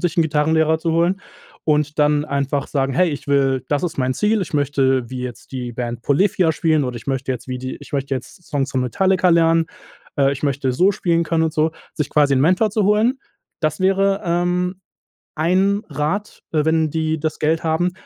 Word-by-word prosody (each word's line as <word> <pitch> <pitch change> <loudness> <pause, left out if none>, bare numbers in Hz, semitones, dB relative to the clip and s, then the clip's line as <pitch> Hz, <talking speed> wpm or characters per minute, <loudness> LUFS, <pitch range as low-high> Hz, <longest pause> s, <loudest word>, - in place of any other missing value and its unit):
sich 175 -1 -1
'nen 165 - +5
Gitarrenlehrer 160 +1 +2
zu 165 0 -1
holen 175 +4 +1 0.4
und 150 -1 +1
dann 150 0 +3
einfach 140 0 -1
sagen: 135 -2 -1
„Hey, 180 0 +3
ich 145 0 -6
will 135 -2 +2
das 145 +2 0
ist 165 -4 -4
mein 130 0 0
Ziel, 210 0 +1
ich 160 - -7
möchte 135 -3 +1
wie 130 -1 -5
jetzt 125 +1 -8
die 125 -2 -4
Band 120 -1 -4
Polyphia 175 +3 +2
spielen 155 -2 +1
oder 125 -1 -4
ich 115 - -10
möchte 135 -1 -2
jetzt 125 - -7
wie 125 0 -3
die 130 +1 -5
ich - - -13
möchte 135 -1 -1
jetzt 130 +7 -8
Songs 140 -2 -1
von 130 - 0
Metallica 185 +8 +2
lernen. 165 -1 +4 0.5
Äh, 140 0 +4
ich 140 - -7
möchte 140 -2 0
so 185 +10 +3
spielen 170 -2 0
können“, 160 +1 +1
und 160 - -1
so. 155 +1 +1 0.2
Sich 150 - -2
quasi 145 -2 +3
'n 130 - +2
Mentor 185 +8 +3
zu 210 -3 0
holen, 220 +6 +2 0.4
das 155 +1 -1
wäre, 195 +1 +2
ähm, 180 +2 0 0.6
ein 190 +6 +2
Rat, 190 +8 -3
äh, 150 -1 +1
wenn 160 -1 +2
die 160 0 -1
das 155 0 -3
Geld 160 +2 0
haben. 170 +3 +1
155 Hz, 205 wpm, -20 LUFS, 140-175 Hz, 0.6 s, nen